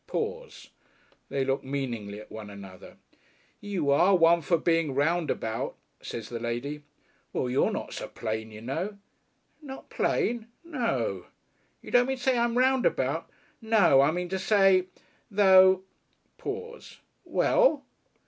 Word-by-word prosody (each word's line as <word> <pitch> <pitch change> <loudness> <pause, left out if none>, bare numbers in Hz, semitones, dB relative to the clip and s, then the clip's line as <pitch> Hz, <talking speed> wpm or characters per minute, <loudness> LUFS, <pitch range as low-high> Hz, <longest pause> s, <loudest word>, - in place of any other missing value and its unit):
Pause. 485 0 -5 0.6
They 135 -1 -1
look 135 0 -1
meaningly 120 -7 -4
at 110 - -13
one 110 -2 -8
another. 100 -2 -12 0.6
"You 185 -8 -1
are 180 +7 +4
a - - +7
one 170 -1 +5
for 165 +3 +2
being 165 -3 +1
roundabout," 145 -7 -1 0.3
says 115 -2 -6
the 120 - -5
lady. 120 +6 -4 0.5
"Well, - - -1
you're 130 - +2
not - - -5
so - - -5
plain, 110 0 -4
you 110 0 -11
know." 180 - -4 0.6
"Not 270 -3 -10
plain?" 230 -1 0 0.2
"No." 135 - -2 0.6
"You - - -10
don't 245 0 +4
mean 265 0 -1
to 250 - -11
say 260 -1 +3
I'm 235 0 +1
roundabout?" 260 0 +1 0.3
"No. 210 -11 +5
I 140 - +4
mean 175 +2 -3
to 190 +1 -2
say... 195 -2 +4 0.4
though 190 -2 +6 0.3
" - - -43
Pause. 475 +1 -7 0.3
"Well?" - - +2
170 Hz, 140 wpm, -27 LUFS, -, 0.6 s, a